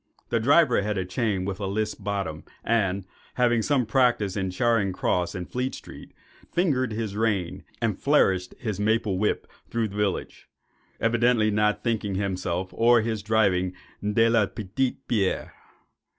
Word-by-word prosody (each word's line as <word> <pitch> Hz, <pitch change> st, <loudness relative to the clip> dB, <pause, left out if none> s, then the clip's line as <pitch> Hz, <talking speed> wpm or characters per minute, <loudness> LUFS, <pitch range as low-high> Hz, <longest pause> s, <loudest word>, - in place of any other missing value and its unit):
The 115 Hz, -, +1 dB
driver 135 Hz, 0 st, +4 dB
had 105 Hz, 0 st, -2 dB
a 95 Hz, -, -1 dB
chain 95 Hz, -1 st, -1 dB
with 100 Hz, 0 st, -4 dB
a 100 Hz, -, -2 dB
list 105 Hz, +2 st, -2 dB
bottom, 95 Hz, -7 st, -3 dB, 0.2 s
and, 100 Hz, -4 st, 0 dB, 0.3 s
having 120 Hz, -2 st, +3 dB
had 110 Hz, -, -1 dB
some 135 Hz, -4 st, +2 dB
practice 120 Hz, -4 st, +2 dB
in 95 Hz, -2 st, -1 dB
Charing 105 Hz, 0 st, +1 dB
Cross 90 Hz, 0 st, 0 dB
and 90 Hz, -2 st, -5 dB
Fleet 125 Hz, +1 st, -2 dB
Street, -, -, -11 dB, 0.4 s
fingered 135 Hz, -9 st, +1 dB
his 110 Hz, -2 st, -3 dB
reins 105 Hz, -6 st, -1 dB, 0.2 s
and -, -, 0 dB
flourished 90 Hz, -1 st, +2 dB
his 110 Hz, -6 st, -4 dB
maple 105 Hz, -2 st, +1 dB
whip 105 Hz, -, 0 dB, 0.2 s
through 115 Hz, -2 st, -1 dB
the 100 Hz, -, -10 dB
village, 105 Hz, -2 st, -2 dB, 0.5 s
evidently 115 Hz, -1 st, +2 dB
not 105 Hz, 0 st, +1 dB
thinking 110 Hz, -4 st, -1 dB
himself 95 Hz, -2 st, -2 dB
or 120 Hz, 0 st, +4 dB
his 110 Hz, -1 st, -2 dB
driving 100 Hz, -4 st, +2 dB, 0.3 s
de 105 Hz, +2 st, +3 dB
la 115 Hz, -3 st, +3 dB
petite 125 Hz, +7 st, -3 dB
bière. 100 Hz, -5 st, 0 dB
105 Hz, 155 wpm, -26 LUFS, 95-115 Hz, 0.5 s, driver